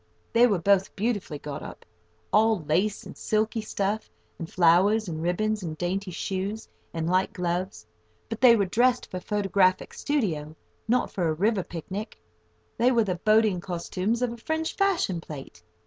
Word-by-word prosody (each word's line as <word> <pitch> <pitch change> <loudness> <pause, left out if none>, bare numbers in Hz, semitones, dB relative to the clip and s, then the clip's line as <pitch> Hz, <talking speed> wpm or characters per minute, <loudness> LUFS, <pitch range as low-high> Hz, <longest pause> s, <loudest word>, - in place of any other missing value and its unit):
They 235 +1 +6
were 205 -5 +2
both 195 +2 +2
beautifully 205 -7 -2
got 145 0 -6
up—all 90 - -2
lace 185 +7 0
and - - -10
silky 220 +1 0
stuff, 210 0 -2 0.3
and 165 -2 -6
flowers, 185 +5 +4
and 160 -2 -4
ribbons, 210 +5 0
and 160 -3 -5
dainty 185 +3 -2
shoes, 195 +4 -4 0.2
and 165 -1 -3
light 185 +2 +1
gloves. 180 +2 -3 0.4
But 225 0 -6
they 245 -2 +8
were 200 -3 +2
dressed 245 +6 +1
for 185 - -3
a - - -6
photographic 195 -2 +1
studio, 165 - -2 0.3
not 245 +2 +1
for 180 -3 -1
a 160 - +1
river 205 +4 +1
picnic. 190 +5 -6 0.6
They 245 +2 +4
were 235 -2 +3
the 185 -4 -2
"boating 215 -4 +3
costumes" 185 +6 -2
of 240 -1 0
a - - -9
French 315 +7 -2
fashion 360 - +1
plate. 135 - -10
195 Hz, 165 wpm, -26 LUFS, 175-220 Hz, 0.6 s, they